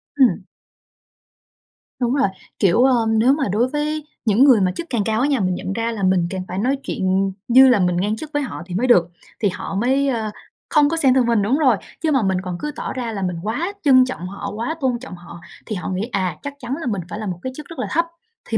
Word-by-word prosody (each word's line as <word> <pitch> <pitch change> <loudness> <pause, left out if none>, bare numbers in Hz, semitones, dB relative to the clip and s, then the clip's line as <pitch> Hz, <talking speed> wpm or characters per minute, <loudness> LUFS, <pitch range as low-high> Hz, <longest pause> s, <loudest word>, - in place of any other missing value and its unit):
Ừm. 265 -4 +3 1.6
Đúng 245 0 +1
rồi, 275 -6 +3 0.3
kiểu, 195 +5 +4
ơm, 230 -4 +3
nếu 255 +4 +5
mà 285 -3 0
đối 230 +5 +2
với 300 +1 -2 0.2
những 220 +3 +4
người 255 -7 +6
mà 185 -1 +2
chức 340 - -5
cảng 230 -5 0
cao 220 +2 0
á 280 - +2
nha, 275 -5 +1
mình 185 -2 0
nhận 190 - -4
ra 230 +1 -1
là 205 -4 -4
mình 185 -2 +2
càng 190 0 -4
phải 180 - -5
nói 265 +5 +1
chuyện 190 +1 0 0.2
như 260 +2 +7
là 240 - +4
mình 180 -1 +1
ngang 205 +4 0
chức 300 +7 -8
với 290 - +1
họ 265 - -5
thì 180 -1 -6
mới 245 +7 +1
được, 175 -8 +5 0.3
thì 205 - +2
họ 195 - -6
mới, 265 +7 +1
ơ, 225 -5 -1 0.4
không 295 -2 +4
có 330 - -1
xem 270 -5 +4
thường 260 -2 +3
mình 230 -3 +2
đúng 235 +8 +1
rồi, 260 -9 +3 0.2
chứ 315 - +1
mà 265 -6 +2
mình 190 -1 +1
còn 180 -2 -5
cứ 300 - -3
tỏ - - -4
ra 245 -3 -3
là 200 - -4
mình 180 -2 -1
quá 305 - -2
trân 255 -3 +6
trọng 180 -8 -5
họ, 200 +1 -6
quá 235 +8 -3
tôn 250 -3 0
trọng 260 -7 -9
họ 175 -1 -12 0.3
thì 215 - -4
họ 180 - -4
nghĩ, 190 +1 -2
à, 185 -5 -1
chắc 285 - -6
chắn 250 0 -4
là 265 - -4
mình 200 -5 -1
phải 205 - -6
là 215 - -4
một 180 -2 -4
cái 260 - -4
chức 300 - -8
rất 330 - -9
là - - -2
thấp, 335 +2 +2 0.4
thì 225 - +1
230 Hz, 260 wpm, -21 LUFS, 195-265 Hz, 1.6 s, như